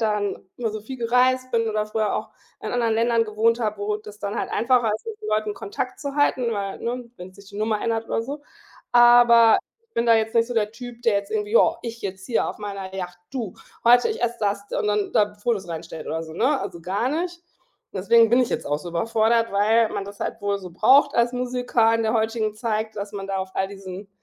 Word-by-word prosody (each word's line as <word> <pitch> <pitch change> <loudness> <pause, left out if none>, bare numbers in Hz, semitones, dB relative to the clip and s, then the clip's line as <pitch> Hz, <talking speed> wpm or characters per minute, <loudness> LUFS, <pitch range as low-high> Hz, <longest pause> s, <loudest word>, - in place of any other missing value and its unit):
dann 210 -2 0 0.2
immer 230 -3 -2
so 215 0 -5
viel 260 +5 -8
gereist 255 +2 +2
bin 230 -2 +1
oder 215 -1 -1
früher 215 -1 -1
auch - - -3 0.3
in - - -4
anderen 235 -2 +1
Ländern 230 0 +2
gewohnt 225 +2 +1
habe, 215 -2 -1
wo 210 +1 -1
das 210 -1 -12
dann 205 +1 -4
halt - - -3
einfacher 235 -2 +2
ist, 220 - -8
mit 440 -2 -6
so 425 - -7
Leuten 215 - 0
Kontakt 250 +6 -5
zu 280 -2 -4
halten. 260 -5 +2
Weil, 200 -2 -3
ne, 240 0 -4
wenn 180 +1 -10
sich 200 +1 -16
die 200 - -11
Nummer 215 0 0
ändert 225 -1 -1
oder - - -1
so. 285 +5 -6 0.5
Aber 240 -1 +7 0.2
ich 460 0 -43
bin 235 - 0
da 230 - +6
jetzt 220 +1 0
nicht 230 0 +4
so 245 - -5
der 210 -2 +1
Typ, 240 0 -10
der 230 -3 +3
jetzt 200 0 -2
irgendwie 210 -1 -2
„Ja, 230 - +5
ich 230 -1 -7
jetzt 190 -1 -6
hier 235 - 0
auf - - -7
meiner 195 -2 -6
Yacht, 180 -2 -6
du, 235 -8 -4 0.3
heute, 245 - +6
ich 440 - -4
esse 240 0 0
das“ 200 -1 -1
und - - -1
dann 210 -1 0
da 205 0 +2
Fotos 205 -2 -2
reinstellt 165 -1 -7
oder 160 0 -3
so, 160 -1 -9
ne, 265 - +1
also 180 -4 -6
gar 195 +8 -1
nicht. 345 +5 -2 0.6
Und - - -7
deswegen 230 +4 +5
bin 240 +3 +4
ich 245 - 0
jetzt - - -2
auch 145 +1 0
so 170 +3 -8
überfordert, 225 +5 +1
weil 220 +3 +3
man 195 - -3
das 200 0 -11
halt - - -4
wohl 200 0 0
so 185 -2 -9
braucht 280 - +4
als 235 +1 +2
Musiker 245 -2 +1
in 230 - +1
der 220 0 +1
heutigen 220 -1 0
Zeit, 220 -1 -2
dass 200 +1 -5
man 195 -1 -5
da 195 -1 -2
auf 190 0 -4
all 190 - +1
diesen 195 0 -9
220 Hz, 240 wpm, -23 LUFS, 200-240 Hz, 0.6 s, Aber